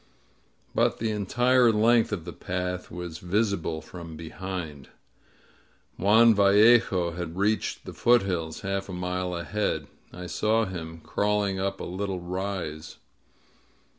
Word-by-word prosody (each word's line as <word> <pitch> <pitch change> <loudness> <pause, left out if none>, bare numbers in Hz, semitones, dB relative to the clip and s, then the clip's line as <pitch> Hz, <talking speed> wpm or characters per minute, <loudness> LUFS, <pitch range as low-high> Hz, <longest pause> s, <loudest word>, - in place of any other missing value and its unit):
But - - +2
the 110 -1 -1
entire 120 +4 +3
length 115 +2 +3
of 90 -6 -3
the 85 - -7
path 90 +1 -4
was 85 -2 -7
visi 100 +3 +1
ble 80 -1 -4
from 85 0 -10
behind. 80 -3 -6 1.1
Juan 110 +4 +5
Yallejo 100 -3 +4
had 85 -1 -5
reached 105 +2 0
the - - -7
foot 120 -1 +4
hills, 85 -4 -3
half 100 0 -3
a - - -5
mile 90 0 -2
ahead. 85 -3 -2 0.3
I 90 0 -8
saw 110 +5 +1
him 80 -4 -7
crawling 100 +1 0
up 95 0 -2
a - - -5
little 95 +1 -3
rise. 90 -3 -5
95 Hz, 135 wpm, -26 LUFS, 85-105 Hz, 1.1 s, Juan